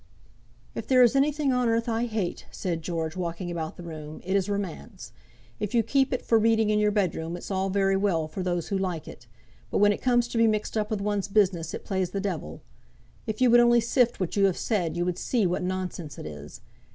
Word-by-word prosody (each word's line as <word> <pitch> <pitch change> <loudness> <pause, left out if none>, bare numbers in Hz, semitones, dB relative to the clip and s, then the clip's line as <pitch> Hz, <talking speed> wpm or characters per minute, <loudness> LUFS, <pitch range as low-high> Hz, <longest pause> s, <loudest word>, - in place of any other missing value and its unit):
"If - - -6
there 255 -1 +6
is 240 +2 +4
anything 285 0 +2
on 250 -2 +2
earth 230 +1 +1
I 230 +1 0
hate," 215 -6 -3
said 170 -4 -3
George, 165 0 -3
walking 175 0 -4
about 160 -2 -4
the 175 - -9
room, 155 -2 -8
"it 190 +2 -1
is 195 0 +1
romance. 200 - -5 0.5
If 210 +2 -3
you 230 - +4
keep 270 +4 +2
it 255 - -2
for 225 - +4
reading 220 -1 +3
in 210 - +2
your 210 0 +3
bedroom, 175 -5 -1
it's 175 - -8
all 190 0 0
very 195 0 +2
well 190 -5 +1
for 155 +5 -6
those 175 -2 -2
who 200 - 0
like 180 -5 -3
it, 120 - -12 0.4
but - - -1
when 205 0 +5
it - - -7
comes 240 -2 +2
to 230 - -1
be 230 - +5
mixed 215 0 -1
up 215 -1 0
with 215 -2 -2
one's 205 -1 -1
business 185 -6 +1
it - - -8
plays 190 -3 -1
the 195 - -3
devil. 200 0 -4 0.6
If 220 +2 -3
you 250 -2 +5
would 240 - +7
only 240 0 +5
sift 235 +1 +2
what 185 -3 -2
you 200 -1 +4
have 190 -3 +1
said, 180 -7 -1
you 175 - 0
would 180 0 -2
see 235 -6 +1
what 180 0 0
nonsense 180 -5 -4
it - - -8
is. 75 -1 -9
195 Hz, 235 wpm, -26 LUFS, 175-225 Hz, 0.6 s, would